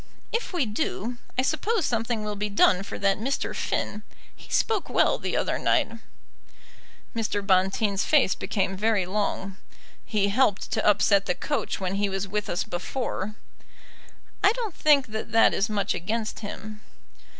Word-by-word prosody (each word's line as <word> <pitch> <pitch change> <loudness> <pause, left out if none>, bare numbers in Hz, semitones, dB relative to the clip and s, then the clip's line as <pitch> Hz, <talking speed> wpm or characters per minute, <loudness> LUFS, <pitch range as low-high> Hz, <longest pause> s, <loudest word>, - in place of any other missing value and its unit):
"If 460 - -2
we 350 -8 +1
do, 225 +2 -3 0.2
I 255 - +3
suppose 360 - 0
something 230 -1 -1
will 210 0 -3
be 210 +1 -2
done 200 -2 +4
for 195 - -6
that 195 0 +1
Mr. 265 +6 -2
Finn. 210 - -2 0.3
He - - -16
spoke 435 -4 +1
well - - +3
the - - -2
other - - 0
night." 290 -8 +2 1.2
Mr. 210 -3 -1
Bonteen's 195 +1 +2
face 285 -11 +4
became 195 -2 -2
very 210 -1 +1
long. 195 0 -2 0.5
"He 205 -3 0
helped 210 -2 +1
to 220 - 0
upset 200 -1 +4
the 180 - +1
coach 290 -2 -2
when 190 0 -2
he 205 - +2
was 195 0 -2
with 210 +2 -2
us 175 - 0
before." 215 +1 -4 1.1
"I 400 - +7
don't 460 -6 -4
think 290 -4 +4
that 220 +1 -5
that 225 - +6
is 200 - 0
much 205 -2 0
against 215 +5 -3
him." 215 0 -7
210 Hz, 160 wpm, -26 LUFS, 195-240 Hz, 1.2 s, I